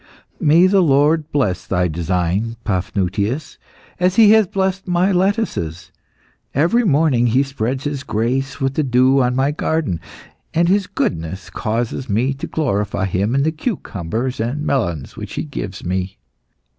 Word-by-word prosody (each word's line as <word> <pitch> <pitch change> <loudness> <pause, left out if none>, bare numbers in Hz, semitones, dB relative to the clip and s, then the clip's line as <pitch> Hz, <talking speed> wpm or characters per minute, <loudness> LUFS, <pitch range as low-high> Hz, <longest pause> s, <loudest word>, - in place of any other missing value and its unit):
"May 165 +1 +5
the 190 +1 +4
Lord 150 0 +3
bless 115 -11 0
thy 90 -1 +1
design, 90 +6 -1
Paphnutius, 100 - -2 0.4
as 180 +1 +2
He 215 -2 +7
has 220 -2 +5
blessed 190 +1 -1
my 180 +2 +2
lettuces. 185 - -1 0.6
Every 170 - +3
morning 145 - +3
He 125 +4 +3
spreads 135 -1 -3
His 145 -2 -3
grace 130 +3 -2
with 135 0 0
the 155 - 0
dew 130 0 +3
on 125 0 +1
my 135 +2 +2
garden, 150 - -1 0.5
and 170 +1 +3
His 195 +1 +2
goodness 85 +3 -3
causes 115 +3 -3
me 120 +7 +1
to 135 - -6
glorify 100 - -1
Him 100 +6 0
in 140 - +2
the 160 - +1
cucumbers 125 - -3
and 125 +7 -2
melons 85 - -1
which - - -7
He - - -2
gives 105 -12 -6
me. 95 +1 -2
130 Hz, 150 wpm, -19 LUFS, 100-160 Hz, 0.6 s, He